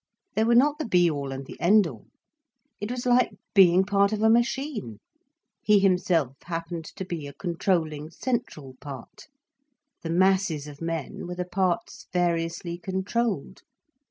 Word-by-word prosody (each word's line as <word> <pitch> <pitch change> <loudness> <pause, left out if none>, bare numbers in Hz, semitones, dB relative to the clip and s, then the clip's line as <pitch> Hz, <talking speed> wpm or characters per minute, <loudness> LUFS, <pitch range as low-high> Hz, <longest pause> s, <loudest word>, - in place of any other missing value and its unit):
They 220 - +2
were 235 +1 +3
not 290 +5 +4
the 310 - -2
be 175 -5 +4
all 140 -2 -4
and 135 0 -6
the - - -11
end 205 +3 +5
all. 125 -10 -8 0.7
It 205 - -4
was 245 0 -4
like 250 0 +3 0.2
being 185 -2 +6
part 200 0 +2
of 215 0 -1
a 220 - +6
machine. 235 - 0 0.6
He 210 -1 +4
himself 180 -8 +2
happened 165 -1 -4
to 190 +3 -7
be 165 -5 -5
a 140 - -9
controlling, 160 -2 -1
central 170 - -4
part, 135 -4 -10 0.7
the 165 - -5
masses 185 -3 +2
of 145 0 -11
men 165 -1 -4
were 180 - -5
the 180 0 -3
parts 180 -1 -2
variously 170 0 -1
controlled. 190 0 -2
180 Hz, 155 wpm, -26 LUFS, 160-205 Hz, 0.7 s, being